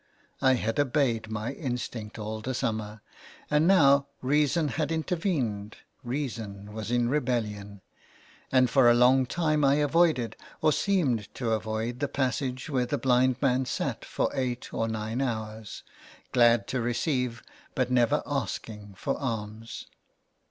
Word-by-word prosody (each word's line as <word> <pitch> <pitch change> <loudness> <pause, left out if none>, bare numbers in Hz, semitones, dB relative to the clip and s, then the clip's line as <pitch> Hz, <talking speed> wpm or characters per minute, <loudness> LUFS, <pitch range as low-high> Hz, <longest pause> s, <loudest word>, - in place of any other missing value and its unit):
I 130 -1 +5
had 115 0 -1
obeyed 130 -6 +1
my 110 +2 -3
instinct 120 -6 -5
all 110 0 -5
the 130 +3 -3
summer, 110 -2 -3 0.5
and 150 +2 +4
now 140 -7 +5 0.2
reason 150 +3 +2
had 155 +1 -2
intervened, 155 - -2 0.3
reason 115 -6 -5
was 110 0 -5
in 120 0 +2
rebellion, 110 -7 -2 0.7
and 130 -1 +5
for 125 0 +5
a 120 - +6
long 125 +2 +5
time 155 0 +1
I 140 0 +5
avoided, 150 -6 +2 0.2
or 155 - +3
seemed 140 - 0
to 120 -3 -2
avoid, 110 +2 -2
the 145 - 0
passage 130 -1 -2
where 130 -5 0
the 145 - -1
blind 130 -1 +2
man 130 -1 +2
sat - - -3
for - - -1
eight 125 -2 -3
or 115 - 0
nine 110 +2 -3
hours, 110 -4 -4 0.5
glad 120 -4 +4
to 130 - -1
receive, 120 0 -1 0.3
but 130 -1 0
never 125 +4 +3
asking 105 -6 -4
for 135 +8 -2
alms. 110 -3 -5
125 Hz, 140 wpm, -28 LUFS, 110-140 Hz, 0.7 s, a